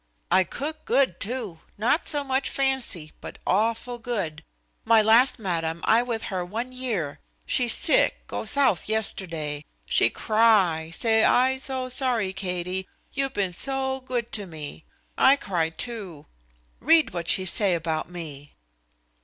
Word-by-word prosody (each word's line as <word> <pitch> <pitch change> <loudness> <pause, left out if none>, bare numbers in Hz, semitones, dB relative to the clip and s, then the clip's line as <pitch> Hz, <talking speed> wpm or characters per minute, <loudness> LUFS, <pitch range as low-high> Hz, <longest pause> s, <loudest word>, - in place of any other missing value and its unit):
I 185 +1 +5
cook 310 - -6
good, 265 -11 +1
too; 215 -7 -3 0.2
not 240 +10 +1
so 290 -2 +2
much 265 0 -1
fancy, 265 - -1
but - - -9
awful 230 +4 0
good. 195 -10 -4 0.4
My 225 0 +5
last 225 +5 +4
madam, 170 -5 -3
I 225 +2 +4
with 235 -2 -4
her 180 -1 -1
one 225 +8 -5
year. 225 - -4 0.3
She 250 - +2
sick, 230 - +4
go - - -5
South 265 - +2
yesterday. 165 -9 -2 0.2
She - - +3
cry, 205 -8 +2
say 220 +5 +2
'I 260 +1 +3
so 260 -1 -3
sorry, 245 -6 0
Katie; 185 -1 -3 0.3
you 275 -1 -1
been 195 -8 -2
so 265 +4 0
good 245 -2 -4
to 205 -3 -1
me.' 155 -2 -8 0.3
I 270 - +6
cry, 175 - -2
too. 190 -4 -6 0.5
Read 320 +3 +3
what 170 -2 -4
she 190 - +4
say 185 0 +4
about 160 -1 -3
me." 150 -5 -9
220 Hz, 145 wpm, -25 LUFS, 175-255 Hz, 0.5 s, I